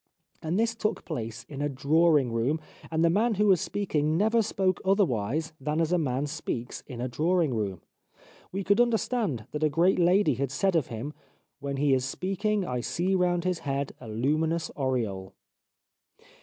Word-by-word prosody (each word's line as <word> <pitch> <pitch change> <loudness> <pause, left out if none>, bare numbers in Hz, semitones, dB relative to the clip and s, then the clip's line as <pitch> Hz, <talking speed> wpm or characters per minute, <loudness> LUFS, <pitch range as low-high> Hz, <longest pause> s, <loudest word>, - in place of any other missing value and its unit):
And 165 +5 -1
this 230 0 +2
took 215 -3 -2
place 115 -7 -5
in 145 -1 -6
a 145 - 0
drawing 145 0 +3
room, 120 +7 0 0.3
and 160 +1 +2
the - - +5
man 220 +4 +2
who 210 +2 +2
was 190 -5 +4
speaking 155 -6 0
never 220 +4 +3
spoke 190 -3 0
otherwise 160 - +1
than 150 +3 -1
as 165 0 +1
a 180 - +3
man 135 -2 0
speaks 140 -5 -4
in 125 -4 -8
a 125 - -1
drawing 160 +3 +1
room. 100 -6 -2 0.7
We 195 +2 -3
could 200 +5 +4
understand 225 - 0
that 150 - -4
a 155 - +4
great 175 +6 +3
lady 175 -2 +4
had 135 +2 -2
said 190 +7 +1
of 160 -6 +2
him: 120 +6 -5 0.2
' - - -46
When 140 -1 -4
he 140 0 +3
is 130 -1 +2
speaking 195 +8 -1
I 125 -4 -2
see 175 +9 -1
round 175 -2 +2
his 180 -1 0
head 140 0 -2
a 120 - -9
luminous 155 +9 0
aureole.' 115 -9 -2
155 Hz, 185 wpm, -28 LUFS, 130-185 Hz, 0.7 s, the